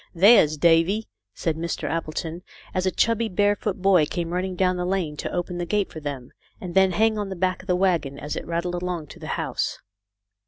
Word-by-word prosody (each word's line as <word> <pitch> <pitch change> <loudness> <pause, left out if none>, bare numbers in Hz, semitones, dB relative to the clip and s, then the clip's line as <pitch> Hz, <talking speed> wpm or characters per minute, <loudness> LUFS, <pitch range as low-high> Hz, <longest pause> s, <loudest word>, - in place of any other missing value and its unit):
"There's 180 -5 +6
Davy," 170 +7 +3 0.3
said 165 -2 -1
Mr. 170 0 -3
Appleton, 165 +1 -3 0.3
as 185 0 0
a - - +2
chubby, 230 +2 +1
barefoot 205 0 0
boy 185 -6 +5
came 170 0 -3
racing 185 +1 -2
down 185 0 +2
the 180 - -2
lane 180 -5 -1
to - - -4
open 175 0 -3
the 175 - -2
gate 205 +2 0
for 160 - -7
them, 140 -4 -6 0.3
and 180 -2 -6
then 190 0 +4
hang 220 +3 +2
on 205 -1 -3
the 190 - -4
back 185 0 0
of 190 - -18
the 180 - +2
wagon 170 -7 +1
as 150 +1 -5
it - - -6
rattled 170 +1 -2
along 180 -3 -3
to - - -12
the - - -8
house. - - -2
180 Hz, 210 wpm, -24 LUFS, 165-190 Hz, 0.3 s, There's